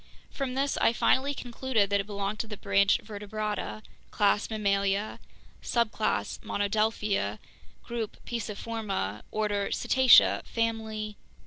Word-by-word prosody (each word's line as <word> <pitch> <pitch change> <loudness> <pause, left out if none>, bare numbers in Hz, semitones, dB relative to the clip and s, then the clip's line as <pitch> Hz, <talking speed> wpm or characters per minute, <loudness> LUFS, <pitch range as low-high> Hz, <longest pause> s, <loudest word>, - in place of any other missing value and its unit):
From 265 -2 -3
this 275 +1 0
I - - +3
finally 275 +4 +2
concluded 240 -5 -1
that 200 - +3
it 195 - -10
belonged 200 0 -3
to 225 - -2
the 210 -1 -7
branch 200 -1 +3
Vertebrata, 210 0 -4 0.3
class 205 0 +2
Mammalia, 200 -1 0 0.4
subclass 225 -2 0
Monodelphia, 205 - 0 0.5
group 235 -3 -4
Pisciforma, 210 - -3
order 205 -2 -1
Cetacea, 260 -1 +5
family 220 -2 -2
215 Hz, 110 wpm, -28 LUFS, 200-230 Hz, 0.5 s, Cetacea